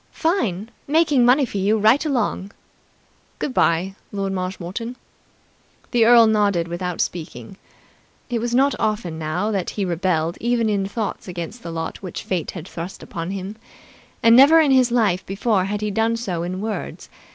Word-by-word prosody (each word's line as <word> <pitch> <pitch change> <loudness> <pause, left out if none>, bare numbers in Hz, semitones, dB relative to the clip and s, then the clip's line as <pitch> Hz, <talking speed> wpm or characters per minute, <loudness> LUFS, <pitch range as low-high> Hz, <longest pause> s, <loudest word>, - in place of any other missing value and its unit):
"Fine. 230 - -1 0.2
Making 295 -3 +3
money 265 +3 +5
for 210 - -6
you 205 +3 +2
right 220 +7 +4
along." 235 -8 -2 0.8
"Good 265 - -3
bye, 180 -2 +1 0.2
Lord 195 -1 -2
Marshmoreton." 190 +5 -4 1.0
The 235 -2 +4
earl 235 0 +7
nodded 205 -6 +2
without 175 0 -4
speaking. 180 +3 -5 0.7
It 240 -3 -2
was 240 0 -1
not 275 +2 +3
often 210 -7 -2
now 175 +7 -2
that 195 -4 -2
he 200 - -3
rebelled 170 -2 -1
even 235 -1 +1
in 200 -2 0
thoughts 205 0 -4
against 175 +6 -6
the 170 - -7
lot 165 -1 -5
which 185 -4 -6
fate 180 -5 -2
had 175 -1 -7
thrust 175 +1 -7
upon 165 +1 -6
him, 195 +2 -5 0.7
and 230 0 +7
never 285 +6 +8
in 300 -4 +4
his 255 -2 +4
life 210 -7 +2
before 195 0 0
had 205 +1 -3
he 210 0 -1
done 225 +3 +1
so 185 -8 -3
in 185 +2 -4
words. 215 0 -5
205 Hz, 165 wpm, -21 LUFS, 180-235 Hz, 1.0 s, never